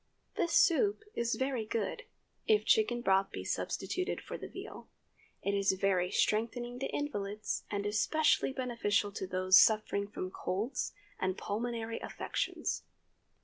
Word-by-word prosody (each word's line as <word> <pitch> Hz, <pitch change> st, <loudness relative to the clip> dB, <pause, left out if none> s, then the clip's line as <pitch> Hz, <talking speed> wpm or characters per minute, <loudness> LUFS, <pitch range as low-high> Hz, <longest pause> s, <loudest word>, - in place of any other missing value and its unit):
This 340 Hz, -, 0 dB
soup 405 Hz, +6 st, +4 dB
is 235 Hz, 0 st, 0 dB
very 260 Hz, -3 st, -1 dB
good, 225 Hz, -, -3 dB, 0.4 s
if 430 Hz, -1 st, +4 dB
chicken 425 Hz, -, +3 dB
broth 195 Hz, -3 st, +3 dB
be -, -, -6 dB
substituted 370 Hz, +1 st, -2 dB
for -, -, -7 dB
the -, -, -6 dB
veal. -, -, -9 dB, 0.6 s
It 200 Hz, -, 0 dB
is 200 Hz, -1 st, +3 dB
very 190 Hz, -2 st, +1 dB
strengthening 240 Hz, +5 st, 0 dB
to 270 Hz, -, -1 dB
invalids, 210 Hz, -8 st, -3 dB
and 200 Hz, -1 st, -2 dB
especially 270 Hz, +9 st, +2 dB
beneficial 235 Hz, -6 st, 0 dB
to 195 Hz, -1 st, -5 dB
those 185 Hz, +1 st, +6 dB
suffering 215 Hz, -2 st, +3 dB
from 185 Hz, -2 st, -5 dB
colds 210 Hz, +9 st, -2 dB, 0.3 s
and 185 Hz, 0 st, -1 dB
pulmonary 230 Hz, +1 st, -3 dB
affections. -, -, -3 dB
220 Hz, 135 wpm, -32 LUFS, 200-255 Hz, 0.6 s, those